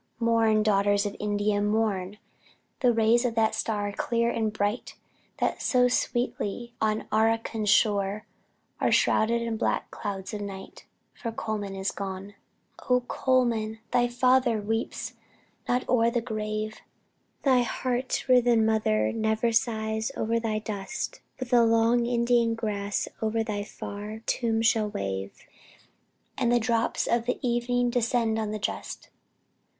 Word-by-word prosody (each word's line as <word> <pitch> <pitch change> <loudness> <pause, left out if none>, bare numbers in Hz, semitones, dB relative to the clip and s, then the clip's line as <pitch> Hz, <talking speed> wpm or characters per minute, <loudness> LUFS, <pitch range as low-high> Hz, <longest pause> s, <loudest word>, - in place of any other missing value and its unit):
Mourn, 225 -2 +3
daughters 205 -1 +2
of 205 - -3
India, 205 0 0
mourn! 205 -2 0 0.6
The 250 -2 +4
rays 230 +1 +3
of 240 -2 -1
that 220 -1 +2
star, 205 -2 -1
clear 235 +3 0
and 220 -2 -1
bright, 210 +2 -2 0.4
That - - -1
so 250 -1 +3
sweetly 240 -2 -2
on 215 0 0
Arracan 225 0 +1
shone 205 0 +2 0.6
Are - - +2
shrouded 235 +2 +3
in 230 -1 -2
black - - -1
clouds 195 -2 -5
of 210 - -4
night, 195 -1 -8 0.3
For 230 - -5
Colman 210 -3 -4
is 190 +1 -1
gone! 195 0 -6 0.6
Oh 250 0 +4
Colman! 240 -4 0
thy 245 0 +3
father 250 -1 +3
weeps 225 +2 -3 0.6
not 250 +1 +1
o'er 235 -2 +3
thy 235 0 0
grave; 215 -1 -3 0.7
Thy 260 -3 +4
heart 250 +1 -2
riven 245 -3 +4
mother 110 - +2
ne'er 220 +1 +1
sighs 220 -1 0
o'er 230 +1 0
thy 220 -2 -1
dust; 210 -2 -5 0.2
But 255 -1 -6
the 240 -1 +6
long 230 +1 +3
Indian 235 -1 +2
grass 205 -3 -2
o'er 220 0 0
thy 210 -2 -3
far 210 +1 -7
tomb 225 -2 0
shall 220 -2 +3
wave, 95 - -5 1.0
And 240 -2 +2
the 240 - +4
drops 230 0 0
of 235 0 0
the 250 - 0
evening 245 0 +1
descend 235 -2 +1
on 215 -1 -2
the 215 - -3
just. 210 - -5
225 Hz, 140 wpm, -27 LUFS, 210-235 Hz, 1.0 s, the